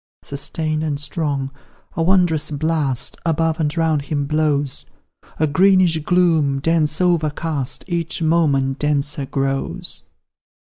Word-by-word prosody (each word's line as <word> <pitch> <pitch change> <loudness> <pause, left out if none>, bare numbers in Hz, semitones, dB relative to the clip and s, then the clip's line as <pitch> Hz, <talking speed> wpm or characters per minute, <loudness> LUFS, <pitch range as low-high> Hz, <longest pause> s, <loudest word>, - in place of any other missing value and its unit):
Sustain'd 155 +2 -3
and 150 -3 -2
strong, 145 -2 -2 0.4
a 165 - -1
wondrous 165 -3 +3
blast 150 -4 -1
Above 165 0 0
and 150 +1 -1
round 160 -3 +2
him 145 0 -2
blows; 145 -2 0 0.5
A 155 - +3
greenish 180 +1 +4
gloom, 160 -4 +2
dense 155 +1 +1
overcast, 155 -5 0
Each 170 -3 -2
moment 145 -5 +1
denser 145 -1 -1
grows. 135 0 -2
155 Hz, 110 wpm, -20 LUFS, 140-165 Hz, 0.5 s, greenish